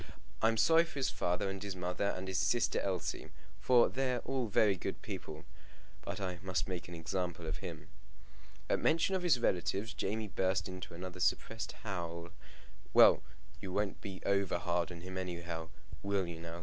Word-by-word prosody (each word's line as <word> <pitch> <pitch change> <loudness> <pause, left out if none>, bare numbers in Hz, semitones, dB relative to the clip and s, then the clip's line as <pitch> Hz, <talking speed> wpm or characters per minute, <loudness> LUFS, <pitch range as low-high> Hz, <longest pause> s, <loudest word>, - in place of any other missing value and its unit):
I'm 115 0 +4
sorry 165 +9 +6
for 165 - -9
his 135 -1 +1
father 90 +2 0
and 95 0 -4
his 100 -2 -4
mother, 90 +2 -1
and 95 +1 -5
his 95 -1 0
sister 120 +4 +2
Elsie, 95 -3 -2 0.3
for 125 -2 +6
they're 130 -2 0
all 130 -3 -1
very 105 -1 +4
good 90 - -5
people; 75 0 -6 0.6
but - - -5
I 90 -2 -3
must 95 -1 -1
make 90 -2 -4
an 90 - -7
example 85 0 -3
of 80 -1 -2
him." 80 -2 -7 0.8
At - - +2
mention 165 +4 +3
of 190 - +1
his 170 -8 +4
relatives 95 +2 0
Jamie 110 +1 -2
burst 95 -1 +1
into 95 -2 -7
another 90 +1 -6
suppressed 115 +5 0
howl. 85 -4 -4 0.7
"Well, - - +8 0.4
you 95 - -6
won't 100 +1 -1
be 95 -2 -7
over 100 -3 +2
hard 85 -1 0
upon 85 -2 -8
him 95 +1 -5
anyhow: 85 -2 -4 0.3
will 100 -1 +1
you 85 -1 -6
now?" 85 0 -6
95 Hz, 175 wpm, -34 LUFS, 85-105 Hz, 0.8 s, Well